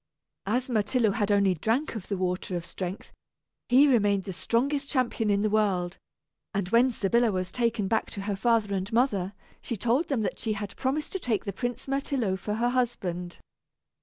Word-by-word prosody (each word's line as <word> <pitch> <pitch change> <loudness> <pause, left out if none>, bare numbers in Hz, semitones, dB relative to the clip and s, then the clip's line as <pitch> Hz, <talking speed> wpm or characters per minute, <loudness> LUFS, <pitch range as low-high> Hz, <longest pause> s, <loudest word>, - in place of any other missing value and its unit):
As 245 +5 +1
Myrtillo 225 -1 +2 0.2
only 200 -1 +4
had 175 - -4
drank 245 +7 +1
of 215 -5 -6
the 200 - -2
water 180 0 -2
of 170 -1 -3
strength, 185 +2 -6 0.6
he 265 +4 +7
remained 205 -7 +3
the 190 - -5
strongest 275 +9 0
champion 245 -5 0
in 200 0 +2
the 215 - +2
world; 195 -4 +1 0.6
and 195 -2 0
when 235 +4 +5
Sybilla 235 0 +2
was 185 -1 -2
taken 230 -4 0
back 225 +2 0
to 200 - -6
her 200 0 -2
father 220 0 +2
and 190 0 -2
mother, 210 -6 +1 0.3
she 235 - -4
told 240 - +1
them 270 -6 0
that - - -3
she 220 -2 -1
had 205 -1 -5
promised 275 +3 -1
to 385 - -3
take 230 - -1
the 200 - -3
Prince 245 +5 -4
Myrtillo 270 -7 0
for 210 +3 -3
her 240 +2 +1
husband. 190 -9 -2
215 Hz, 190 wpm, -27 LUFS, 195-245 Hz, 0.6 s, he